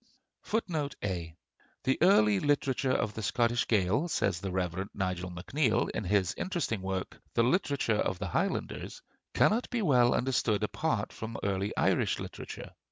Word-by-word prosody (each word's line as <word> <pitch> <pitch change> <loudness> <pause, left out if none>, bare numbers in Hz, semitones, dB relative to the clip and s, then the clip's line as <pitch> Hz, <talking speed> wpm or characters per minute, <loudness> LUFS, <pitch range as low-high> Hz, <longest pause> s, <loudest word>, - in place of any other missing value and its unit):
[A] 85 -5 -3 0.5
"The 130 - +2
early 110 - +5
literature 140 -1 +1
of 110 -4 0
the 110 - -5
Scottish 120 +2 +1
Gael," 110 - +2
says 100 - 0
the 100 - -3
Rev. 90 +1 -2
Nigel 90 -2 -2
MacNeill 110 - 0
in 105 - -3
his 95 -1 +2
interesting 165 - -1
work 95 0 -4
'The 115 - +4
Literature 130 - +1
of 95 - 0
the 95 -1 -4
Highlanders,' - - -2 0.3
"cannot 230 +4 +3
be 235 -3 -1
well 125 -7 +4
understood 120 -4 +1
apart 110 -1 -1
from 110 0 -6
early 100 0 0
Irish - - +2
literature. - - -7
110 Hz, 145 wpm, -30 LUFS, 95-130 Hz, 0.5 s, early